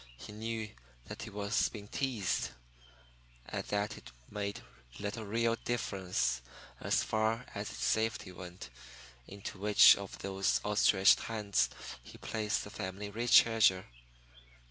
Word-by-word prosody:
He 85 - -10
knew 110 0 -4 0.3
that - - -8
he 115 - -6
was 100 +1 0
being 105 -2 -9
teased, 105 - -1 1.0
and - - -3
that 105 0 -2
it - - -14 0.2
made 100 -1 -4 0.4
little 105 +2 -4
real 115 +2 +1
difference, 90 - -1 0.4
as - - +1
far 110 +2 0
as - - -4
its - - -6
safety 110 -3 0
went, 90 -7 -10 0.6
into 100 0 -8
which 105 +1 +8
of 100 -1 -8
those 95 0 0
outstretched 105 -2 +5
hands 105 -3 0 0.3
he - - -13
placed 110 -1 -2
the 105 - -9
family 100 +2 -5 0.2
treasure. 110 -6 +5
105 Hz, 125 wpm, -33 LUFS, 95-110 Hz, 1.0 s, which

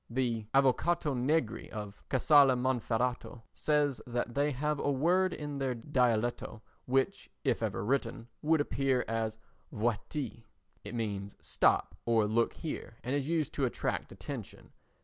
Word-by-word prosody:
The 115 -3 -1
Avvocato 140 +3 +3
Negri 130 0 0
of 105 -1 -7
Casale 140 0 +6
Monferrato 125 -1 -1
says 145 -3 +1
that 120 0 -2
they 145 +3 +2
have 150 +2 -1
a - - 0
word 175 +7 +3
in 145 -3 -5
their 130 -2 0
dialetto 120 -3 0 0.2
which, 135 +9 0
if 130 -5 +1
ever 105 -3 -2
written, 115 -2 -1
would 160 0 +3
appear 135 -3 +1
as 110 -1 -1 0.3
"vuaitee," 115 +2 -2 0.4
it - - -6
means 100 -3 -3
"stop" - - +2
or 115 -2 +4
"look 115 +2 +1
here," 135 -7 -6
and 125 - -2
is 145 +1 -1
used 160 -4 0
to 140 - +1
attract 125 - -2
attention. - - -8
125 Hz, 140 wpm, -32 LUFS, 115-145 Hz, 0.4 s, Casale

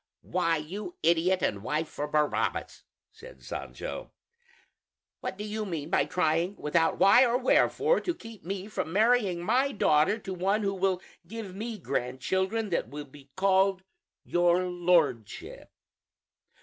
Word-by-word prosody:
"Why, 165 -2 +1
you 195 - -6
idiot 170 +3 +3
and 100 - 0
wife 155 +8 -1
for 150 - -4
Barabbas," 150 0 -1 0.3
said - - -14
Sancho, - - -6 1.1
"what 190 - -5
do 205 - -5
you 215 +1 -3
mean 165 -5 -5
by - - +3
trying, 175 +1 0
without 165 0 +1
why 240 +6 +7
or 245 -1 +2
wherefore, 435 - +3
to 350 - -2
keep 225 -3 -12
me 195 +2 -4
from 185 -6 -4
marrying 205 -3 +2
my 255 +8 +2
daughter 155 - +3
to 195 -4 -6
one 195 +4 0
who 195 -1 0
will 190 -1 0 0.2
give 210 -2 -7
me 225 +2 -5
grandchildren 190 - -1
that 170 -9 -1
will 145 +2 -7
be 140 0 -16
called 190 0 +2 0.4
'your 175 +1 +2
Lordship'? 175 - 0
185 Hz, 140 wpm, -28 LUFS, 165-210 Hz, 1.1 s, why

